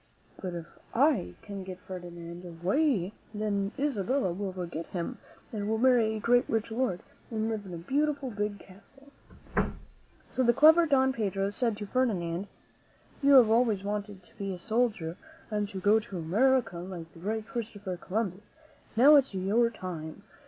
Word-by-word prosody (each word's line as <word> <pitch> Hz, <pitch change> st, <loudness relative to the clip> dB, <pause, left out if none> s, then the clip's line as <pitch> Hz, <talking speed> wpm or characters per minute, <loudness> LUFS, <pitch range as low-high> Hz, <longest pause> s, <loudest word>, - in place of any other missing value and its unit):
But 180 Hz, -2 st, -4 dB
if 170 Hz, -1 st, -5 dB, 0.3 s
I 245 Hz, -, +3 dB
can 200 Hz, -2 st, -6 dB
get 185 Hz, -1 st, -7 dB
Ferdinand 175 Hz, -2 st, -8 dB
away, 185 Hz, -, 0 dB, 0.2 s
then 205 Hz, -1 st, -1 dB
Isabella 265 Hz, -6 st, 0 dB
will 195 Hz, +1 st, -3 dB
forget 175 Hz, -3 st, -5 dB
him, 175 Hz, -2 st, -4 dB, 0.3 s
and 205 Hz, -1 st, -2 dB
will 220 Hz, -, +1 dB
marry 235 Hz, -3 st, +4 dB
a -, -, -3 dB
great, 245 Hz, +3 st, +3 dB
rich 225 Hz, 0 st, -1 dB
lord 225 Hz, -6 st, 0 dB, 0.3 s
and 220 Hz, -1 st, -1 dB
live 215 Hz, -3 st, -3 dB
in 180 Hz, -, -8 dB
a -, -, -5 dB
beautiful, 280 Hz, -, -1 dB
big 210 Hz, -1 st, -2 dB
castle." 250 Hz, +10 st, -18 dB, 1.2 s
So -, -, -2 dB
the 240 Hz, -2 st, +4 dB
clever 320 Hz, +4 st, +7 dB
Don 265 Hz, -2 st, +3 dB
Pedro 200 Hz, -4 st, -1 dB
said 230 Hz, 0 st, 0 dB
to 210 Hz, -, -5 dB
Ferdinand, 195 Hz, -7 st, 0 dB, 0.7 s
"You 280 Hz, 0 st, +5 dB
have 240 Hz, -4 st, +8 dB
always 225 Hz, -4 st, +3 dB
wanted 205 Hz, -1 st, -4 dB
to -, -, -24 dB
be 195 Hz, -1 st, -2 dB
a 185 Hz, -, -4 dB
soldier 210 Hz, -4 st, -1 dB, 0.3 s
and 210 Hz, -1 st, -1 dB
go 210 Hz, +2 st, +5 dB
to 210 Hz, -4 st, -7 dB
America 200 Hz, +3 st, +2 dB
like 175 Hz, -2 st, -8 dB
the 165 Hz, -, -14 dB
great 215 Hz, +4 st, -2 dB
Christopher 210 Hz, -6 st, -4 dB
Columbus. 195 Hz, +2 st, -4 dB, 0.4 s
Now 280 Hz, +6 st, +8 dB
is 270 Hz, -7 st, +1 dB
your 210 Hz, +6 st, +2 dB
time. 180 Hz, -4 st, -7 dB
205 Hz, 160 wpm, -29 LUFS, 185-240 Hz, 1.2 s, have